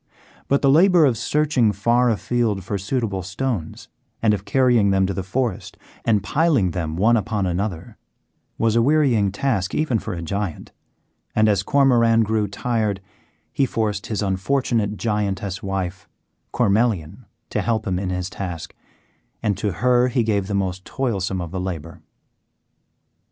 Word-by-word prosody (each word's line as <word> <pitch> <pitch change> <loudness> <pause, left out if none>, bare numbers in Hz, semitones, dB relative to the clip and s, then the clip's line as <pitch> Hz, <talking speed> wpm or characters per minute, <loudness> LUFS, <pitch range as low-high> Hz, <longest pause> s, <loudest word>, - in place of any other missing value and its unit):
But 140 +1 +1
the 135 - +5
labour 175 +1 +6
of 130 -4 +2
searching 130 -1 +1
far 120 +5 +2
afield 110 -2 0
for 100 +2 -3
suitable 100 -2 -2
stones, 95 -1 -4 0.3
and 110 -2 +3
of 100 -1 -3
carrying 125 -6 +3
them 95 -1 +3
to 95 - -2
the 95 - -3
forest 110 +2 -3 0.3
and 105 -3 +2
piling 140 - +2
them 80 -3 -3
one 110 +7 +3
upon 105 -2 -1
another, 90 -1 -3 0.6
was 115 -1 +1
a 115 - +4
wearying 125 -7 +3
task 100 -4 -1
even 135 -8 +1
for 105 -3 -5
a 85 - -5
giant, 100 0 -4 0.6
and 110 0 +4
as 100 -3 +2
Cormoran 115 -3 +3
grew 110 -1 0
tired 105 -1 -1 0.5
he 135 - +2
forced 105 -3 -2
his 105 -2 -2
unfortunate 105 +1 0
Giantess 100 -3 -2
wife, 95 0 -4 0.4
Cormelian, 105 -3 0 0.2
to - - 0
help 115 -2 -1
him 90 -3 -1
in 95 -1 -3
his 90 -1 -2
task, 90 -5 -6 0.7
and 105 -3 +1
to 105 0 -1
her 125 +3 +3
he 125 -1 +1
gave 100 -3 0
the 100 - -2
most 95 -1 -2
toilsome 100 -8 -2
of 85 -2 -6
the 95 0 -3
labour. 85 -2 -6
105 Hz, 155 wpm, -22 LUFS, 95-120 Hz, 0.7 s, labour